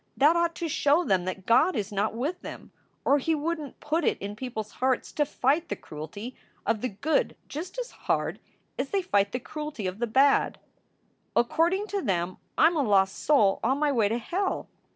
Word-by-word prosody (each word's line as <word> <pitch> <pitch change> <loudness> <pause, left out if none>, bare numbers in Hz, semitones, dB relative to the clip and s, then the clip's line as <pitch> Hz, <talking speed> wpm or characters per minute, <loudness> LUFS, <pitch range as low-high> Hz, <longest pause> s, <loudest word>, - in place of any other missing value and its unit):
That 300 +4 +5
ought 340 0 +1
to 335 - -3
show 290 +2 +3
them 185 - +1
that 185 0 -4
God 255 +10 +4
is 210 -2 -2
not 205 +2 0
with 310 +9 -2
them - - -9 0.3
or 285 +1 +4
he 320 +4 +1
wouldn 310 -1 -2
t - - -40
put 315 +3 0
it - - +2
in 200 +1 -6
people 245 -1 -4
s 215 - -11
hearts 260 -1 0
to 295 -2 0
fight 295 +5 +1
the - - -1
cruelty 180 +11 -8 0.3
of 225 -2 +1
the 255 - -1
good 280 +11 0
just 335 - -6
as - - -4
hard - - -1 0.4
as 270 +1 -1
they 395 -2 0
fight 200 - +2
the 250 - -2
cruelty 300 -5 -6
of 185 +2 -3
the 240 - 0
bad. 270 +5 +3 0.8
"According 335 - +2
to 400 -1 -1
them 185 - -1 0.2
I - - +6
m 335 +1 +4
a - - +3
lost 195 -5 +3
soul 210 -10 +3
on 260 +4 +2
my 295 0 +2
way 225 -6 +2
to 230 - 0
hell. 370 - -2
270 Hz, 210 wpm, -27 LUFS, 210-320 Hz, 0.8 s, I